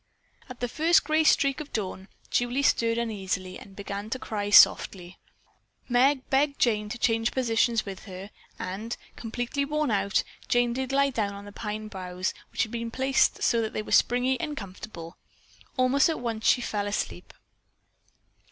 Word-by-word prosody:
At 255 -1 -10
the 245 - 0
first 325 +7 +3
gray 310 0 +2
streak 275 -3 +3
of 300 -1 -8
dawn, 190 -2 -4 0.2
Julie 245 +3 +1
stirred 230 -4 +2
uneasily 190 -5 -3
and 195 - -14
began 200 +1 -6
to 260 - -2
cry 205 -4 -4
softly. 185 -3 +5 0.7
Meg 265 +2 +3
begged 280 +1 +2
Jane 210 -3 +1
to 240 - -5
change 225 -1 +1
positions 230 -2 +1
with 195 -2 -8
her, 190 +1 -9 0.3
and, 205 +6 -5 0.2
completely 245 +4 -3
worn 300 -2 -1
out, 200 -1 +1 0.2
Jane 245 -1 +2
did 260 +1 -3
lie 280 0 +3
down 205 -5 -2
on 200 0 -9
the 205 - -10
pine 215 +1 -5
boughs 185 -2 -4 0.2
which - - +1
had 220 - -6
been 230 -1 -3
so - - -13
placed 265 +1 +2
that 230 -2 0
they 215 - -2
were - - -10
springy 250 +2 +3
and 300 -3 -4
comfortable. 185 -4 -9 0.6
Almost 260 +4 +4
at 320 - -2
once 230 -2 -2
she 245 - +4
fell 205 -3 -2
asleep. 205 -3 -4
230 Hz, 170 wpm, -27 LUFS, 200-260 Hz, 0.7 s, softly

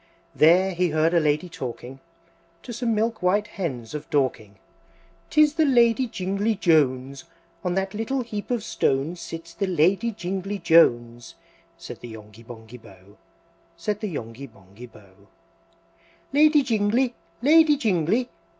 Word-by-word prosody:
There 180 +5 +4
he 180 0 0
heard 155 +2 +1
a 170 - +4
Lady 150 +3 0
talking, 130 -3 -8 0.6
To 240 - -8
some 230 -1 -1
milk 225 +1 -1
white 195 +3 +1
Hens 145 - -6
of 150 - -7
Dorking, 125 -8 -1 0.7
"'Tis 305 -1 +4
the 320 0 +2
Lady 245 -2 +3
Jingly 200 +2 -2
Jones! 140 -7 +1 0.4
On 180 -1 -1
that 195 0 -2
little 235 +5 -2
heap 210 -3 -7
of 240 -4 -1
stones 145 +3 -1
Sits 165 0 -9
the 195 - -2
Lady 185 +6 +2
Jingly 195 0 -4
Jones!" 120 - +2 0.4
Said - - -10
the 120 - -10
Yonghy 110 0 -13
Bonghy 115 +1 -12
Bò, 100 -1 -18 0.6
Said 205 +5 -3
the 215 - -4
Yonghy 125 -1 -7
Bonghy 100 +3 -15
Bò. 110 - -17
III. 95 -1 -24 1.2
"Lady 300 0 +5
Jingly! 235 +1 +1 0.3
Lady 305 +1 +5
Jingly! 220 - 0
180 Hz, 140 wpm, -24 LUFS, -, 1.2 s, Lady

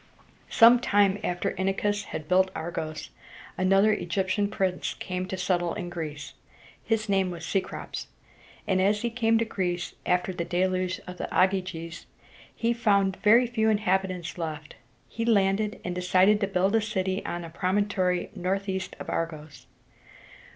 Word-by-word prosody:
Some 235 +1 +7
time 205 -3 +3
after 175 -3 -1
Inachus 205 +2 0
had 155 - -6
built 185 +2 +4
Argos, 160 -1 -5 0.4
another 195 +3 +4
Egyptian 190 +1 0
prince 190 -3 -1
came 185 0 -4
to 190 - -4
settle 175 -2 0
in 175 - -5
Greece. 155 -4 -6 0.5
His 220 -1 0
name 195 -2 +2
was 170 -2 -7
Ce´crops, 190 +2 -3 0.6
and, 190 -2 +1
as 205 +3 +2
he 235 - -1
came 225 -1 +2
to 230 - +1
Greece 180 -5 -3
after 180 +1 +1
the 175 - -3
Deluge 185 +1 -1
of 180 -1 -8
Ogyges, 185 -3 0 0.5
he 235 0 +1
found 200 -5 +2
very 230 +4 +5
few 225 -2 +1
inhabitants 190 -4 0
left. 155 -3 -5 0.3
He 230 - -4
landed, 210 -1 +2
and 180 - -2
decided 185 +3 +3
to 200 - +1
build 195 +2 +1
a 225 - +4
city 190 -2 -2
on 175 0 -4
a 165 - -9
promontory 185 0 0
northeast 190 0 -2
of - - -7
Argos. 155 -3 -5
190 Hz, 145 wpm, -27 LUFS, 180-205 Hz, 0.6 s, Some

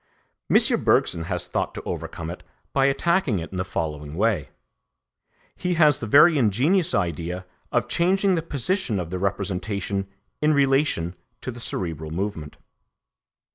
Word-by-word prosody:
M. - - +4
Bergson 80 - +2
has 90 0 -2
thought - - -2
to - - -6
overcome 85 0 -5
it 90 - -9 0.3
by 135 -1 +3
attacking 145 - +1
it 85 -1 -6
in 95 - -5
the 95 - 0
following 75 -4 -4
way. 100 -6 0 1.1
He 180 -1 -1
has 150 -4 +4
the 115 - -4
very 150 +6 +6
ingenious 135 - +2
idea 90 0 -2 0.3
of - - +1
changing 190 +3 +2
the 165 - +1
position 155 - -1
of 85 -2 -5
the 90 - -3
representation 100 0 -2 0.3
in 150 0 +3
relation 135 - +2 0.3
to 130 - -4
the 120 - -10
cerebral 80 -8 -4
movement. 80 -3 -4
100 Hz, 145 wpm, -24 LUFS, 90-145 Hz, 1.1 s, very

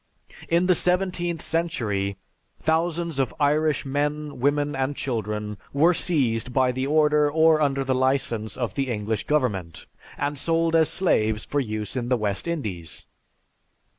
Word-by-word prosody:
"In 170 +2 +3
the 180 - +5
seventeenth 180 -1 0
century, 105 - -1 0.4
thousands 165 -1 0
of 135 - 0
Irish 150 0 +2
men, 145 +1 -2
women 145 +2 +1
and 135 +2 -1
children, 105 -5 -3
were 160 +6 +4
seized 130 -9 0
by 130 0 +2
the 130 +2 -2
order 150 0 +3
or 160 +1 +4
under 140 -2 +1
the 130 0 0
license 130 -5 0
of 120 -3 -2
the 135 -2 -2
English 110 -1 -2
government, 105 - -1 0.3
and 145 -1 -2
sold 165 +2 +2
as 160 -1 +4
slaves 110 - +1
for 145 - -1
use 110 -3 -4
in 120 -1 -2
the 125 - +3
West 105 - -2
Indies. 100 - -4
140 Hz, 145 wpm, -24 LUFS, 115-160 Hz, 0.4 s, the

